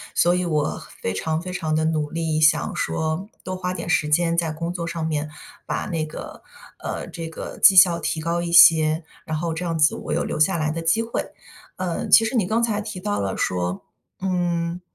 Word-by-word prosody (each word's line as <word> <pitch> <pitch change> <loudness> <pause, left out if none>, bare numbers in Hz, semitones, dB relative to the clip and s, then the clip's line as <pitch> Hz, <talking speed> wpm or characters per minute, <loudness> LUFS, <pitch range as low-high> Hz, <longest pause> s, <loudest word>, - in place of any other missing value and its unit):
所 175 - +4
以 180 0 0
我 155 -3 -1 0.2
非 95 - -2
常 160 +11 -2
非 180 +2 -6
常 160 -3 -1
地 155 0 +1
努 155 -2 0
力， 160 -1 -1
想 155 0 +3
说 160 +4 -2 0.2
多 185 - -4
花 180 0 -3
点 185 - -6
时 155 -4 +1
间 170 +2 +2
在 170 -2 0
工 165 +2 -4
作 175 -2 -4
上 170 -1 -3
面， 150 -1 -2 0.4
把 - - -2
那 165 -3 -2
个 155 - -9 0.4
呃， - - -4
这 165 -1 -7
个 160 - -8
绩 195 - +8
效 180 -2 +7
提 160 - -2
高 170 +2 -1
一 170 0 -3
些， 160 -1 +6 0.2
然 160 -1 -3
后 165 +1 -2
这 165 +3 -4
样 165 -2 -2
子 150 -1 +3
我 - - -6
有 - - 0
留 - - -3
下 170 +4 +3
来 155 -1 0
的 165 +1 -4
机 165 +7 +2
会。 230 - -3 0.5
呃， 180 -2 -3
其 225 - +7
实 225 - -2
你 220 -6 +2
刚 225 +4 +1
才 215 -3 0
提 210 -3 -6
到 205 +2 -2
了 95 -1 -3
说， 90 +1 -2 0.4
嗯， 175 -2 -1
170 Hz, 235 characters per minute, -23 LUFS, 155-180 Hz, 0.5 s, 绩